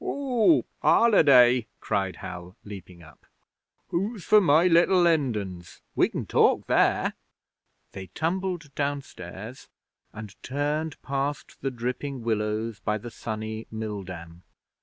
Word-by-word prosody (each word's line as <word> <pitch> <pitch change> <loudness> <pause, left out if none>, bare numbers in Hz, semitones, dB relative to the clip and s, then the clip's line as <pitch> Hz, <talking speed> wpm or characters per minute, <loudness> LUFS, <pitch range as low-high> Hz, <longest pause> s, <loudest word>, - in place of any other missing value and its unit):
'Whoop! 275 +2 +2 0.2
Holiday!' 130 - +5
cried 95 -2 -1
Hal, 90 +1 -9
leaping 95 -4 -10
up. 80 - -18 0.6
'Who's 200 +3 -2
for 215 0 +5
my 165 -1 +4
Little 175 +1 +4
Lindens? 105 - -1
We - - +3
can - - -5
talk - - +3
there.' - - +2 0.8
They 95 -1 -8
tumbled 170 - -3
downstairs, 130 - -5 0.4
and 110 -2 -10
turned 145 +3 -2
past 140 +1 -3
the 135 - -1
dripping 125 +1 -4
willows 110 0 -2
by 105 +1 -1
the 115 +3 -9
sunny 110 0 -6
mill 110 -2 -5
dam. 85 -2 -10
120 Hz, 115 wpm, -26 LUFS, 105-155 Hz, 0.8 s, Holiday